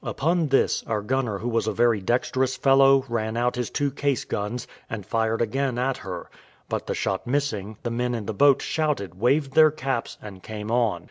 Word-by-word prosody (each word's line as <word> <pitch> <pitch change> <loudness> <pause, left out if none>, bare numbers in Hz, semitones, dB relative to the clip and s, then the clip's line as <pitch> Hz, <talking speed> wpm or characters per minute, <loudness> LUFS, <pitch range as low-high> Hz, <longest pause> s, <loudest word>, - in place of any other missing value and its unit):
Upon 165 +2 0
this, 135 -1 +2
our 105 -2 -1
gunner 125 -3 -1
who 115 - -5
was 115 -2 0
a - - +2
very 115 -1 +2
dexterous 130 +5 0
fellow 135 0 +5
ran 110 -1 -2
out 120 +1 +1
his 125 -2 -2
two 145 -1 -1
case 140 -1 -1
guns, 105 +4 -3 0.2
and 105 -4 -5
fired 115 +1 0
again 130 +2 -1
at 130 +1 0
her, 90 -2 -7 0.4
but - - -3
the - - -1
shot 95 +4 -2
missing, 110 -7 -2
the 120 - -2
men 120 +1 -1
in 110 -3 -4
the 110 - -3
boat 140 +5 +4
shouted, 150 - -1
waved 135 +3 +2
their 155 +1 +7
caps, 135 -5 -3
and 100 -3 -10
came 105 +1 -6
on. 115 -7 +1
120 Hz, 200 wpm, -25 LUFS, 110-135 Hz, 0.4 s, their